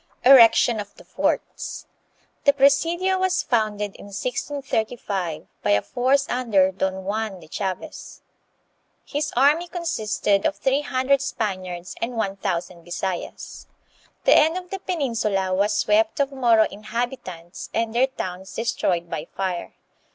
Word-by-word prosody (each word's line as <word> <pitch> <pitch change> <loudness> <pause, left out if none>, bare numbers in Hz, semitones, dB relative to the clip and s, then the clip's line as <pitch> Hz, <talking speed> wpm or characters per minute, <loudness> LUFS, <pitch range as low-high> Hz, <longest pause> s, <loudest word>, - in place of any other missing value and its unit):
Erection 235 -3 +7
of 205 -1 -7
the - - -15
Forts. - - -2 0.6
The 285 - +6
presidio 335 +7 +3
was 375 -1 +1
founded 210 -4 -1
in - - -12
1635, 220 - -3 0.2
by - - -1
a 100 0 +4
force 270 +3 +1
under 210 -7 +2
Don 190 0 -2
Juan 210 -1 -2
de 160 - -14
Chaves. 190 +2 -5 0.8
His 295 +1 -2
army 295 +7 +4
consisted 215 - 0
of 305 - -2
three 270 +1 +1
hundred 265 0 +1
Spaniards 185 -8 -4
and 235 +1 -3
one 200 -3 -1
thousand 175 -3 -3
Bisayas. 180 +1 -5 0.6
The - - +6
end 320 +3 +4
of 360 0 -8
the 390 - -3
peninsula 230 - -1
was 200 +3 +1
swept 220 +3 +2
of 280 0 +1
Moro 240 -5 +4
inhabitants 210 -5 -5
and 225 0 -1
their 250 +3 +3
towns 190 -7 -6
destroyed 180 -6 0
by 165 -1 -5
fire. 185 -3 -3
220 Hz, 135 wpm, -23 LUFS, 190-270 Hz, 0.8 s, Erection